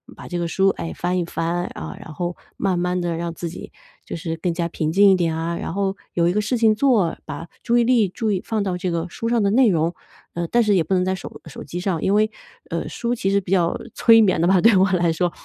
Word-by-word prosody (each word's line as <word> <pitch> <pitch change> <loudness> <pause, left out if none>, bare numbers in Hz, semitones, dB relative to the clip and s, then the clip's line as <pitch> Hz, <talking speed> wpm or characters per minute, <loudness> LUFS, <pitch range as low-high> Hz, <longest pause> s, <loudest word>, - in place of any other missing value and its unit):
把 - - -10
这 175 - -3
个 170 - -1
书， 190 +3 +2
哎， 165 - -4
翻 180 +1 -1
一 175 - -1
翻， 170 +1 -2
啊， 195 - -7
然 170 -6 -10
后 175 +3 -4 0.2
慢 185 -3 0
慢 180 +1 0
地 170 -1 -2
让 170 0 -3
自 170 0 -5
己 - - -10 0.3
就 - - -6
是 165 0 -4
更 175 +1 -1
加 170 0 -2
平 155 -2 -2
静 200 +4 +6
一 - - +5
点 170 -3 0
啊， 170 +1 -2
然 - - -5
后 195 0 -1 0.2
有 170 0 +2
一 - - 0
个 210 - +1
事 220 +4 0
情 225 -2 +4
做， 215 -8 +2
把 165 - -7
注 235 - +1
意 240 - +4
力 235 -3 +3
注 215 +3 -2
意 185 - -1
放 220 -2 -1
到 185 -3 -2
这 180 +1 -2
个 170 -1 -1
书 230 - -5
上 235 -3 +2
的 200 - +2
内 250 +3 +5
容， 165 -1 +1 0.4
呃， 170 0 -3
但 240 +6 +3
是 210 -2 +2
也 175 - +3
不 190 - -2
能 180 - +2
在 190 - 0
手 185 - -8
手 155 - -9
机 175 - -6
上， 180 -5 -1
因 195 - +1
为 215 +1 +2 0.4
呃， - - -2
书 235 -1 -2
其 210 -5 -1
实 200 0 +3
比 185 - -8
较 175 -3 +2 0.2
催 225 -1 +6
眠 190 -6 +3
的 170 - +3
吧， 190 0 +4
对 225 +1 +6
我 190 +1 +4
来 175 -2 +2
说， 175 +1 0
180 Hz, 295 characters per minute, -22 LUFS, 170-205 Hz, 0.4 s, 静